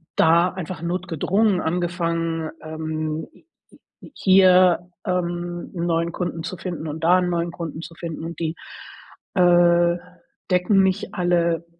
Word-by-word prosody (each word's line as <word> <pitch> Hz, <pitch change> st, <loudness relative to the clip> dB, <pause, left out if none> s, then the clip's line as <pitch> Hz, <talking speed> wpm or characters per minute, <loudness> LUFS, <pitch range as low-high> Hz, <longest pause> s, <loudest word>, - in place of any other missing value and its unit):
da 170 Hz, +3 st, +4 dB
einfach 180 Hz, -2 st, -7 dB
notgedrungen 185 Hz, +3 st, 0 dB
angefangen, 165 Hz, -1 st, -1 dB
ähm, 155 Hz, 0 st, -4 dB
h -, -, -20 dB
h 325 Hz, -1 st, -21 dB
hier, 185 Hz, -2 st, +5 dB, 0.2 s
ähm, 175 Hz, -1 st, -3 dB
'n 170 Hz, -1 st, -2 dB
neuen 170 Hz, 0 st, 0 dB
Kunden 175 Hz, -3 st, -4 dB
zu 175 Hz, +3 st, -5 dB
finden 170 Hz, -4 st, -5 dB
und 155 Hz, +2 st, -6 dB
da 180 Hz, +2 st, +5 dB
'n 180 Hz, -1 st, 0 dB
neuen 170 Hz, 0 st, -1 dB
Kunden 165 Hz, -2 st, -6 dB
zu 165 Hz, -, -10 dB
finden 165 Hz, -2 st, -6 dB
und 170 Hz, +1 st, -7 dB
die, 165 Hz, 0 st, -2 dB, 0.8 s
äh, 175 Hz, -1 st, +4 dB, 0.5 s
decken 185 Hz, +2 st, +3 dB
nicht 190 Hz, +1 st, -1 dB
alle 170 Hz, -2 st, +1 dB
175 Hz, 135 wpm, -22 LUFS, 165-180 Hz, 0.8 s, hier